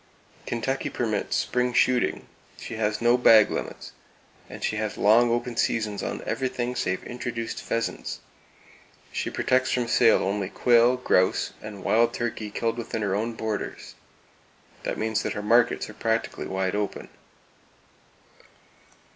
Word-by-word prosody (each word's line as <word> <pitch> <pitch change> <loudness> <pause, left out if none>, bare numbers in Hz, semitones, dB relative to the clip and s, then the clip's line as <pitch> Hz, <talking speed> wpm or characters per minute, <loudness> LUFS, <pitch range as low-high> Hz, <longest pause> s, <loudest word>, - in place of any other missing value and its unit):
Kentucky 130 +3 -2
permits 110 -4 -2
spring 125 0 0
shooting; 125 0 +2 0.3
she - - -7
has 110 +1 -1
no 120 +1 +4
bag 110 -3 +7
limits, - - -5 0.6
and - - -9
she 110 - -1
has 110 -1 -3
long 115 +3 +5
open 120 +1 -1
seasons 110 -3 0
on - - -4
everything 125 -2 -2
save 95 - -1
introduced 120 -2 -5
pheasants; 115 -1 -3 0.9
She - - -2
protects 130 0 +1
from 125 -2 0
sale 115 -1 +4
only 100 0 -1
quail, 120 +3 +4
grouse 95 -7 +1
and 105 -2 -8
wild 115 +1 +3
turkey 115 -2 -3
killed 115 +3 -2
within 115 -1 -3
her 100 -2 0
own 110 +4 -1
borders. 110 -2 -5 0.9
This - - -3
means 110 0 0
that - - -2
her 105 - -5
markets 115 +3 +3
are 110 - -10
practically 115 +1 -2
wide 95 -1 -1
open. 105 -1 -3
115 Hz, 140 wpm, -26 LUFS, 105-120 Hz, 0.9 s, bag